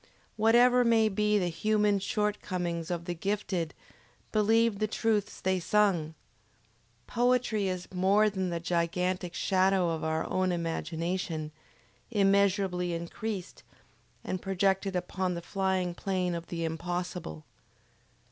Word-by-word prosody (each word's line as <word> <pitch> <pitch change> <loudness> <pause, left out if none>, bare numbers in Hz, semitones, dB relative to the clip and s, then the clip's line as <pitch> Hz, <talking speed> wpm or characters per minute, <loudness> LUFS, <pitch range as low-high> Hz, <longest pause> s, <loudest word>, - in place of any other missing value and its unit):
Whatever 240 +3 +5
may 225 -2 +4
be 210 +1 +2
the 180 -3 0
human 210 +3 +1
short 210 +1 -1
comings 170 -3 -3
of 170 -1 -3
the 175 - -2
gifted, 185 -2 -2 0.6
believe 220 0 +3
the 215 - +1
truths 215 -1 -1
they 190 0 0
sing! 175 -5 +1 0.9
Poetry 240 -4 +1
is 185 -1 -3
more 195 +4 +4
than 190 -3 -1
the 170 -1 -2
gigantic 175 +1 -1
shadow 190 -2 +2
of 160 - -3
our 160 0 -1
own 185 0 +1
imagination, 165 -1 -3 0.6
immeasurably 195 -4 +2
increased, 185 +3 -5 0.6
and 185 - -3
projected 195 0 0
upon 180 0 -2
the - - -3
flying 190 -2 -1
plane 185 -1 -1
of 170 0 -5
the 165 -1 -3
Impossible. 175 - -4
185 Hz, 120 wpm, -29 LUFS, 175-210 Hz, 0.9 s, Whatever